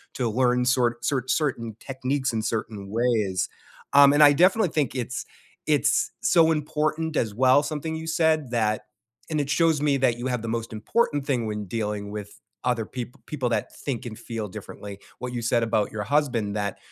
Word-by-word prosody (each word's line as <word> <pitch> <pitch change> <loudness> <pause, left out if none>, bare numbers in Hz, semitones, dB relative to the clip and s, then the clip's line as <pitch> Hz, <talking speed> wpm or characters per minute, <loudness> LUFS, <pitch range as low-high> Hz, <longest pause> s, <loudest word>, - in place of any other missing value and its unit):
to 125 -3 0
learn 125 +2 +2
sor 125 -2 +2
cer 135 -2 0
certain 120 -7 -1
techniques 130 0 -2
in 110 - 0
certain 110 -2 -3
ways. 110 -5 +1 0.4
Um, 140 0 +8
and 145 - +4
I 145 - +9
definitely 185 +6 +4
think 150 -5 0
it's 125 -1 -3 0.4
it's - - +2
so 165 -1 +4
important, 155 +1 -1
as 110 -3 0
well, 130 +4 +5
something 155 +1 -3
you 160 0 -5
said, 160 -5 +1
that 110 -3 0 0.4
and 155 -2 0
it 140 - -4
shows 160 -1 +3
me 145 -2 +2
that 125 -3 +2
you 125 - -2
have 125 -2 -1
the 115 - -3
most 115 - -10
important 145 - 0
thing 125 -5 0
when 105 -1 -3
dealing 105 0 -3
with 105 -1 -8 0.3
other 120 -3 +1
peop 125 +1 -7
people 135 -5 -2
that 120 - -2
think 130 -5 -4
and 110 -3 -7
feel 115 -2 -5
differently. 100 0 -9 0.2
What 125 0 -5
you 120 - -2
said 115 0 +2
about 110 -2 0
your 105 -1 -3
husband 125 -7 0
that 100 -2 -2
125 Hz, 190 wpm, -25 LUFS, 110-145 Hz, 0.4 s, I